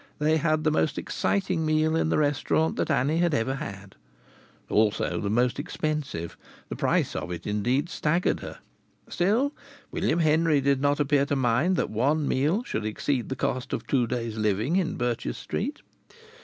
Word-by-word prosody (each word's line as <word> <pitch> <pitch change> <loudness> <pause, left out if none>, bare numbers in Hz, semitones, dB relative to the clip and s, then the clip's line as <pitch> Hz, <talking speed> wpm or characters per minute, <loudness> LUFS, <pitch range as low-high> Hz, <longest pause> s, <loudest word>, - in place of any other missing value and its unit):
They 155 +2 +2
had 155 0 +1
the 155 - +2
most 155 0 +1
exciting 185 -4 -1
meal 155 0 +2
in 160 - +1
the - - +2
restaurant 150 +2 +1
that - - -1
Annie 145 +3 +2
had 170 -3 +2
ever 130 +3 0
had; 100 -4 -7 0.7
also 105 -1 +1
the 100 - -2
most 120 +4 +1
expensive; 150 - -3 0.3
the - - -4
price - - +1
of - - -4
it 90 -1 -6
indeed 120 +9 0
staggered 170 +1 0
her; - - -8 0.5
still, 230 +11 +1 0.4
William 160 - 0
Henry 160 -1 +3
did 140 -1 +1
not 145 +1 +2
appear 140 -1 +2
to 145 - 0
mind 130 +8 +2
that - - -1
one 140 +7 +1
meal 155 - +1
should 110 - -3
exceed 120 +4 -2
the 130 - -2
cost 130 -1 -2
of - - -3
two 125 -4 +1
days 115 -2 -3
living 110 - +1
in 185 -4 0
Birches 120 -1 -2
Street. 280 +9 -4
145 Hz, 170 wpm, -26 LUFS, 120-160 Hz, 0.7 s, Henry